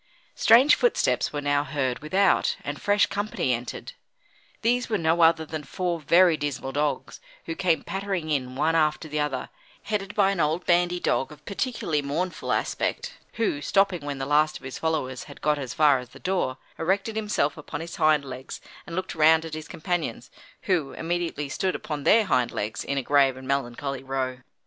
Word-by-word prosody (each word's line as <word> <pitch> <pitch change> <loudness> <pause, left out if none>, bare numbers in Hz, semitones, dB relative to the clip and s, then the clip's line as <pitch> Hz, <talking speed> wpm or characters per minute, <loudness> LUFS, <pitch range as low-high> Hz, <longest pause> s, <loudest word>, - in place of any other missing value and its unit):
Strange 245 +6 +6
footsteps 485 - +2
were 145 - -3
now 145 0 +1
heard 135 -3 -2
without, 190 +6 +2
and 145 +1 -5
fresh 205 0 +3
company 205 -10 -1
entered. 120 +1 -5 0.7
These 245 +2 +1
were 215 - +1
no 165 0 +2
other 165 -1 +5
than 155 0 -5
four 175 +4 -2
very 170 +3 +5
dismal 145 -3 -3
dogs, 145 +1 -2 0.3
who - - -3
came 180 - +1
pattering 190 -4 -3
in 130 -3 -1
one 155 +4 +1
after 155 0 +1
the 150 0 -3
other, 140 -4 -2 0.3
headed 205 -1 -3
by 195 -2 +4
an 195 - -3
old 160 +3 0
bandy 175 0 +2
dog 135 - 0
of 150 - -14
particularly 200 - -1
mournful 160 +6 -3
aspect, - - -2
who, 210 -11 -1
stopping 195 0 +2
when 145 -1 -4
the 135 - -3
last 150 +2 +2
of - - -20
his 130 0 -7
followers 150 -6 -2
had - - -12
got 150 -1 +1
as 130 0 -5
far 150 -4 +5
as 125 -1 -10
the - - -14
door, 180 -8 -1 0.2
erected 195 +6 0
himself 210 -9 0
upon 150 -1 -7
his 165 +1 -7
hind 155 -2 +3
legs 130 0 -7 0.3
and 170 - -6
looked 185 +1 -3
round 160 0 +4
at 160 - -7
his 155 0 -6
companions, 175 +1 -3 0.3
who 180 - 0
immediately 165 -3 -2
stood 185 +6 -1
upon 150 -3 -5
their 225 0 +5
hind 125 -9 +2
legs, 105 +1 -3
in 140 - -2
a 135 - 0
grave 135 -1 +3
and 130 0 -10
melancholy 135 0 -2
row. 130 -1 -3
155 Hz, 185 wpm, -26 LUFS, 140-185 Hz, 0.7 s, Strange